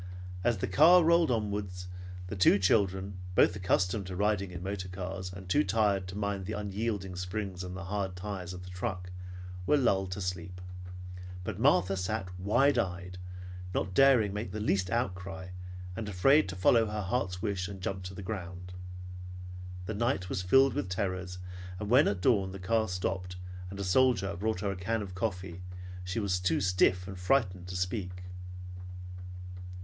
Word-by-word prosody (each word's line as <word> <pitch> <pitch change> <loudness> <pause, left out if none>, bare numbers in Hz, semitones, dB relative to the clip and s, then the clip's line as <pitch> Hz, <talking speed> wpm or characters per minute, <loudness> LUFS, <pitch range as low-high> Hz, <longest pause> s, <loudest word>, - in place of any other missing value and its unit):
As 120 0 +3
the - - -1
car 165 - +7
rolled 170 -1 +5
onward, 105 -4 0 0.6
the 90 - -5
two 95 +1 +6
children, 95 -1 +2 0.2
both 85 - +5
accustomed 95 +1 +1
to 90 - -4
riding 100 -1 +1
in 90 0 -6
motor 95 -1 -3
cars, 95 0 -4
and 90 0 -9
too 90 - +4
tired 100 -2 +2
to 95 +2 -6
mind 100 -2 -1
the - - -2
unyielding 100 -2 -2
springs 95 0 -3
and 90 0 -5
hard 95 +1 -2
tires 90 -1 -4
of 90 0 -7
the 90 - -9
truck, 90 -1 -3 0.6
were 150 - +5
lulled 95 -8 +2
to 95 - -5
sleep; 90 -1 -3 0.8
but 105 0 -4
Martha 95 - +4
sat 95 +1 -2
wide 120 +8 +4
eyed, 90 -3 -3 0.6
not 95 - 0
daring 125 -4 +6
to - - -6
make 105 -3 -3
the 110 - -3
least 95 -3 +1
outcry, 95 -4 -2 0.5
and 105 +1 -3
afraid 135 +9 +5
to 95 - -4
follow 115 +5 +5
her 105 0 -2
heart's 90 -1 -1
wish 100 -3 0
and 100 -1 -7
jump 95 +1 -2
to 90 +1 -7
the 100 - -6
ground. 90 -2 -5 1.1
The 110 - -2
night 110 -4 0
was 90 - -1
filled 135 +8 +5
with 95 - -2
terrors, 90 -1 -2 0.4
and 105 0 -3
when 130 +4 +7
at 100 -3 0
dawn 95 -4 +3
the - - -5
car 110 +4 +2
stopped, 90 0 -2 0.3
and 100 +1 -7
a - - -1
soldier 100 -2 +3
brought 105 +1 -1
her 100 -2 0
a - - -3
can 105 +4 -1
of 95 -2 -7
coffee 90 -3 -3 0.4
she 90 +4 -2
was 95 -4 +1
too 90 -3 +2
stiff 90 -1 +3
and 95 -2 -7
frightened 90 -3 +2
to 90 - -5
speak. 90 0 -2
95 Hz, 175 wpm, -31 LUFS, 90-105 Hz, 1.1 s, car